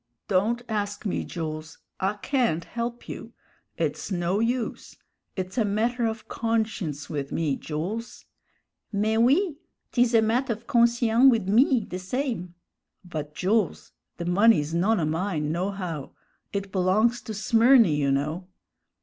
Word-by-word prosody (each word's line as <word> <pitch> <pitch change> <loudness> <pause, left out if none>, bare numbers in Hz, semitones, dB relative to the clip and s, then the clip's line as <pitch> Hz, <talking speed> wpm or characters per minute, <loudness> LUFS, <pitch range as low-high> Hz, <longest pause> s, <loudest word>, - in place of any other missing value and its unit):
"Don't 215 +5 +1
ask 205 -1 -3
me, 200 - -1
Jools, 155 -2 -6 0.2
I 195 +1 +1
can't 215 - 0
help 235 0 -5
you. - - -8 0.4
It's - - -2
no 180 +2 0
use; 230 +1 -2 0.4
it's 185 +4 -3
a - - +4
matter 230 +4 0
of 220 0 -5
conscience 215 -10 -2
with 140 -3 -4
me, 155 -4 0
Jools." 185 - -5 0.7
"Mais 215 +1 +1
oui! 290 - +3 0.3
'tis 240 -1 +3
a 225 - +6
matt' 245 +5 +1
of 230 0 -3
conscien' 235 0 +4
wid 225 -7 +1
me, 235 +2 +4
the 185 - -5
same." 190 -3 -3 0.5
"But, 150 -4 -6
Jools, 200 -1 0 0.3
the 170 - -4
money's 175 -4 +4
none 195 +5 +2
o' 160 - +1
mine, 155 -1 -1
nohow; 180 -4 -3 0.4
it 200 -1 -4
belongs 210 +6 +2
to 220 - -6
Smyrny, 230 - +5
you 145 -1 +1
know." 155 +6 -1
205 Hz, 140 wpm, -26 LUFS, 175-235 Hz, 0.7 s, a